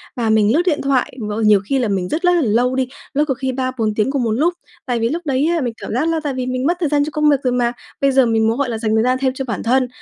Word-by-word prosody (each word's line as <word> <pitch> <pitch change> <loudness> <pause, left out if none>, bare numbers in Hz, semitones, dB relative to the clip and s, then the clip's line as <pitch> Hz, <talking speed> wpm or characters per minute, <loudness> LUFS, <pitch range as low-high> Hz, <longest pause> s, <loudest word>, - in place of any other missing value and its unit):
Và 235 -3 -1
mình 220 +1 +3
lướt 330 - +3
điện 310 -5 +1
thoại 270 -2 0
v 210 0 -4
nhiều 210 -2 +6
khi 270 +5 0
là 240 - 0
mình 190 -3 -1
rất 320 - -2
rất 355 0 +4
là 345 - +2
lâu 245 +1 +1
đi, 260 -1 0 0.3
lướt 295 +2 +2
có 270 - 0
khi 260 +1 -3
3-4 255 -4 -2
tiếng 215 +5 0
cùng 275 -4 -1
một 225 - 0
lúc. 315 +10 +1 0.3
Tại 245 -3 -1
vì 230 +1 0
lúc 335 +3 -3
đấy 275 +1 +1
á 325 - 0
mình 240 -3 -2
cảm - - -7
giác 280 +7 0
là 325 - 0
tại 285 -2 -2
vì 255 -1 -3
mình 255 +1 -2
mất 345 +2 +1
thời 320 -6 0
gian 290 -1 +2
cho - - -4
công 300 0 +3
việc 285 - +4
rồi 250 -1 +1
mà, 240 -1 +1 0.3
bây 275 0 +3
giờ 265 -1 +4
mình 225 -1 +2
muốn, 225 +2 0
gọi 280 -2 -1
là, 225 - -2
dành 220 -1 0
thời 220 - +3
gian 255 +1 +2
thêm 260 -1 +1
cho 265 0 -5
bản 235 - -4
thân. 255 +2 +2
255 Hz, 335 wpm, -18 LUFS, 230-280 Hz, 0.3 s, nhiều